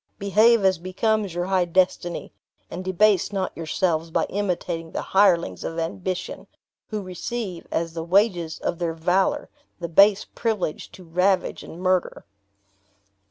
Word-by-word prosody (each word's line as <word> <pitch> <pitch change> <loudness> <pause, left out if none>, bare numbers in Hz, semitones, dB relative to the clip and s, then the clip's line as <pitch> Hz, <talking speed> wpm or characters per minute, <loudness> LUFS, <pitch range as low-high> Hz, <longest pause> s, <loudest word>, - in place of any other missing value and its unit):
Behave 215 +2 +4
as 190 -3 +3
becomes 195 +1 -1
your 175 0 -1
high 185 -1 +2
destiny; 175 0 0 0.4
and 180 +2 -5
debase 190 +1 +2
not 190 -2 -2
yourselves 165 0 -1
by - - +1
imitating 175 -4 -2
the - - -2
hirelings 175 - +3
of 165 - -5
ambition, 180 +3 -4 0.4
who 215 -2 -4
receive, 185 0 -5
as 165 0 -1
the 165 -1 -4
wages 175 -2 +2
of 170 - -3
their 165 -2 -2
valor, 180 +4 +1 0.3
the 170 - -3
base 200 +4 +5
privilege 215 -9 -3
to 185 - -12
ravage 180 +3 +1
and - - -10
to - - -11
murder. 185 -1 0
185 Hz, 145 wpm, -24 LUFS, 170-200 Hz, 0.4 s, base